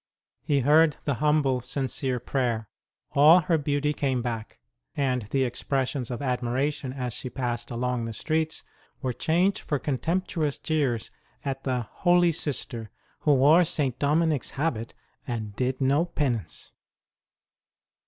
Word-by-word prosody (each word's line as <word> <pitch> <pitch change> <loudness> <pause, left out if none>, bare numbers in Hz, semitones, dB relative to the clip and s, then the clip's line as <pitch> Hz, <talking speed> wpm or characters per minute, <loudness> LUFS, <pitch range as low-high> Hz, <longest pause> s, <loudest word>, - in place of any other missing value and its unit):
He 140 -1 +1
heard 150 +3 +5
the 145 - 0
humble, 150 -4 +2
sincere 130 0 -2
prayer. 120 -3 -1 0.4
All 155 +5 +7
her 170 -2 +1
beauty 145 0 0
came 130 -4 -1
back; 115 -3 -4 0.4
and 125 -6 0
the 135 +2 +1
expressions 130 +1 -1
of 125 +2 -4
admiration 130 +2 -1
as 125 -3 -4
she 125 - -5
passed 120 -2 -3
along 125 0 -1
the 115 - -4
streets 160 +5 -1 0.4
were 130 -1 0
changed 180 - +1
for 145 - -2
contemptuous 155 +2 -1
jeers 135 -8 -1 0.3
at 135 -1 -3
the 130 -2 0
holy 175 - +3
Sister 135 -7 -2 0.3
who 150 -2 +3
wore 150 +7 +6
St. 140 -6 0
Dominic 150 0 +2
s - - -2
habit 135 -6 -2 0.3
and 110 -5 -4
did 130 +2 -1
no 140 +5 +3
penance 130 - -2
135 Hz, 135 wpm, -26 LUFS, 125-150 Hz, 0.4 s, All